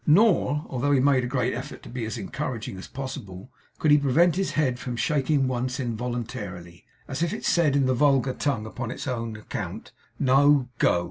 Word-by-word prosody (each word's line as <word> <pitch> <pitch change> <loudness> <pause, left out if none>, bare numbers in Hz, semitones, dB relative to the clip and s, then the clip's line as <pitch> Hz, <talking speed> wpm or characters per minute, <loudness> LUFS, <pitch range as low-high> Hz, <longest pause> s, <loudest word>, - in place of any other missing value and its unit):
Nor, 155 - +4
although 140 +3 0
he 135 - +4
made 135 -1 +3
a - - -1
great 125 -1 0
effort 130 +5 -7
to - - -10
be 120 -2 -4
as 110 - -4
encouraging 115 -1 -4
as - - -9
possible, 130 -6 -7 0.3
could 155 - +2
he 150 - +7
prevent 155 +5 +3
his 195 +1 -1
head 130 -5 +1
from 125 0 -4
shaking 140 +2 +1
once 130 +1 -2
involuntarily, 115 -8 -5 0.2
as 135 +2 -4
if 170 -1 +1
it - - -5
said 155 -5 +3
in 140 -1 +3
the 130 - +2
vulgar 135 0 +3
tongue, 130 -7 -1
upon 120 +2 -5
its 125 - -6
own 115 -3 -3
account, 105 - -6 0.3
'No 140 0 +4
go! 90 - +4
130 Hz, 195 wpm, -26 LUFS, 120-145 Hz, 0.3 s, he